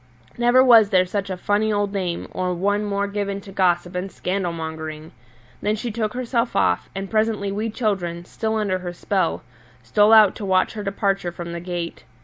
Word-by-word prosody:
Never 240 Hz, +2 st, +5 dB
was 230 Hz, -5 st, +7 dB
there 185 Hz, -2 st, +4 dB
such 195 Hz, +1 st, -3 dB
a 185 Hz, -, -3 dB
funny 210 Hz, +3 st, +1 dB
old 205 Hz, -1 st, 0 dB
dame 180 Hz, -4 st, -2 dB
or 180 Hz, -1 st, -2 dB
one 205 Hz, +4 st, 0 dB
more 200 Hz, -1 st, -1 dB
given 200 Hz, -1 st, -3 dB
to 195 Hz, -, -12 dB
gossip 175 Hz, -2 st, +1 dB
and 180 Hz, +1 st, -4 dB
scandal 180 Hz, -1 st, -2 dB
mongering! 160 Hz, -1 st, -6 dB, 0.5 s
Then 210 Hz, +1 st, +1 dB
she 230 Hz, +2 st, -4 dB
took 215 Hz, 0 st, -2 dB
herself 245 Hz, -1 st, -1 dB
off, -, -, +1 dB
and 195 Hz, 0 st, -4 dB
presently 215 Hz, -1 st, 0 dB
we 215 Hz, +3 st, -2 dB
children, 185 Hz, -7 st, -2 dB
still 220 Hz, +4 st, -3 dB
under 200 Hz, -4 st, 0 dB
her 175 Hz, -1 st, -6 dB
spell, 185 Hz, 0 st, -1 dB, 0.4 s
stole 205 Hz, -, +4 dB
out 215 Hz, -3 st, +7 dB
to -, -, -7 dB
watch 185 Hz, -1 st, +2 dB
her 215 Hz, -, -5 dB
departure 195 Hz, -2 st, -1 dB
from 170 Hz, 0 st, -7 dB
the 170 Hz, -, -4 dB
gate. 175 Hz, -1 st, -5 dB
200 Hz, 190 wpm, -22 LUFS, 180-215 Hz, 0.5 s, was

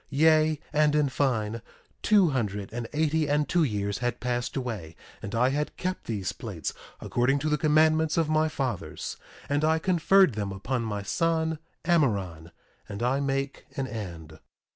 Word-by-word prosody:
Yea, 155 Hz, +1 st, +4 dB
and 150 Hz, 0 st, +3 dB
in 150 Hz, -1 st, +3 dB
fine, 115 Hz, -5 st, 0 dB, 0.4 s
two 200 Hz, -5 st, +5 dB
hundred 105 Hz, -6 st, -2 dB
and 120 Hz, -1 st, -4 dB
eighty 155 Hz, 0 st, +1 dB
and 150 Hz, 0 st, +2 dB
two 175 Hz, -2 st, +2 dB
years 100 Hz, -4 st, -1 dB
had 120 Hz, -1 st, -2 dB
passed 125 Hz, +1 st, -2 dB
away, 105 Hz, -11 st, -4 dB, 0.3 s
and 100 Hz, -, -5 dB
I 125 Hz, +3 st, +3 dB
had 150 Hz, +2 st, -2 dB
kept 185 Hz, 0 st, -3 dB
these 100 Hz, -5 st, -2 dB
plates -, -, -5 dB, 0.3 s
according 125 Hz, +3 st, +1 dB
to 150 Hz, +2 st, -1 dB
the 150 Hz, -, +2 dB
commandments 155 Hz, +1 st, +3 dB
of 165 Hz, -2 st, +2 dB
my 155 Hz, 0 st, +2 dB
fathers; 130 Hz, -, -4 dB, 0.3 s
and 145 Hz, +1 st, 0 dB
I 160 Hz, +1 st, +3 dB
conferred 185 Hz, -1 st, +4 dB
them 105 Hz, -2 st, -3 dB
upon 120 Hz, +6 st, -2 dB
my 105 Hz, -3 st, -3 dB
son 160 Hz, +6 st, 0 dB, 0.3 s
Amaron. 100 Hz, -, +1 dB, 0.4 s
And 100 Hz, +2 st, -5 dB
I 130 Hz, +3 st, +2 dB
make 140 Hz, 0 st, -2 dB
an 135 Hz, -, 0 dB
end. 85 Hz, -10 st, -7 dB
135 Hz, 165 wpm, -27 LUFS, 110-155 Hz, 0.4 s, two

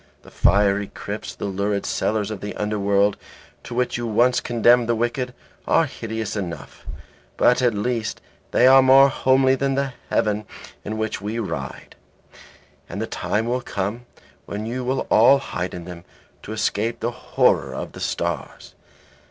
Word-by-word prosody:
The -, -, -15 dB
fiery 100 Hz, 0 st, +3 dB
crypts, 105 Hz, +1 st, -7 dB
the -, -, -5 dB
lurid 100 Hz, +1 st, -1 dB
cellars 105 Hz, -1 st, -1 dB
of 105 Hz, -, -6 dB
the 105 Hz, -, -5 dB
underworld, 100 Hz, -1 st, +1 dB, 0.5 s
to 120 Hz, -, -7 dB
which 125 Hz, 0 st, 0 dB
you 120 Hz, -, -3 dB
once 120 Hz, +3 st, +3 dB
condemned 120 Hz, 0 st, +3 dB
the 120 Hz, -, +3 dB
wicked, 120 Hz, +2 st, -1 dB, 0.4 s
are -, -, +4 dB
hideous 110 Hz, -1 st, -5 dB
enough, 85 Hz, -7 st, -7 dB, 0.5 s
but 125 Hz, -, +4 dB
at 120 Hz, -3 st, +2 dB
least 115 Hz, +2 st, -2 dB, 0.3 s
they 125 Hz, -, +3 dB
are 135 Hz, +1 st, +8 dB
more 135 Hz, +1 st, +7 dB
homely 130 Hz, 0 st, +3 dB
than 135 Hz, 0 st, 0 dB
the 135 Hz, -1 st, -1 dB, 0.2 s
heaven 105 Hz, 0 st, 0 dB, 0.4 s
in 110 Hz, +1 st, -4 dB
which 110 Hz, -2 st, -3 dB
we 105 Hz, +3 st, -4 dB
ride. 70 Hz, -, -5 dB, 0.9 s
And -, -, -5 dB
the -, -, -1 dB
time 110 Hz, +2 st, -2 dB
will 125 Hz, +2 st, -1 dB
come 110 Hz, +4 st, -4 dB, 0.4 s
when 105 Hz, +2 st, -4 dB
you 125 Hz, +3 st, -3 dB
will 130 Hz, +2 st, -1 dB
all 120 Hz, +6 st, +7 dB
hide 90 Hz, -9 st, -4 dB
in 85 Hz, -1 st, -8 dB
them, 90 Hz, -1 st, -9 dB, 0.4 s
to -, -, -9 dB
escape 110 Hz, +2 st, -1 dB
the 120 Hz, -, -1 dB
horror -, -, +1 dB
of -, -, -5 dB
the -, -, -11 dB
stars." 85 Hz, -4 st, -4 dB
110 Hz, 160 wpm, -22 LUFS, 100-125 Hz, 0.9 s, are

